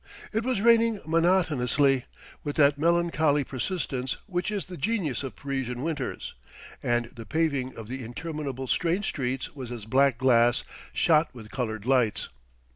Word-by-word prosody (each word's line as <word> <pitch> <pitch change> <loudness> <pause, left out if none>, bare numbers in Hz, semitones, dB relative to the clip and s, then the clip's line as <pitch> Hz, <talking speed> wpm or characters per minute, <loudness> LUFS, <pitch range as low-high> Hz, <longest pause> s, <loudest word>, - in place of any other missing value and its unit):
It 220 +1 0
was 255 -4 0
raining 230 -1 +4
monotonously, 150 -6 +2 0.4
with 145 -1 -3
that 145 -1 +4
melancholy 160 -3 +2
persistence 130 -1 -2
which 180 -1 -2
is 205 -2 -2
the 185 - -8
genius 170 - -1
of 135 -2 -6
Parisian 135 -3 -3
winters; 150 -5 -3 0.5
and 120 0 +1
the 115 - -7
paving 140 0 -1
of 110 -2 -7
the 130 +2 -5
interminable 135 +1 -5
strange 175 - 0
streets 130 -4 -2
was 130 -4 -7
as 115 -4 -6
black 135 +1 +3
glass 120 -2 +4 0.3
shot 160 0 +3
with 110 -3 -11
coloured 110 -4 -3
lights. 125 -5 +2
140 Hz, 145 wpm, -27 LUFS, 125-165 Hz, 0.5 s, raining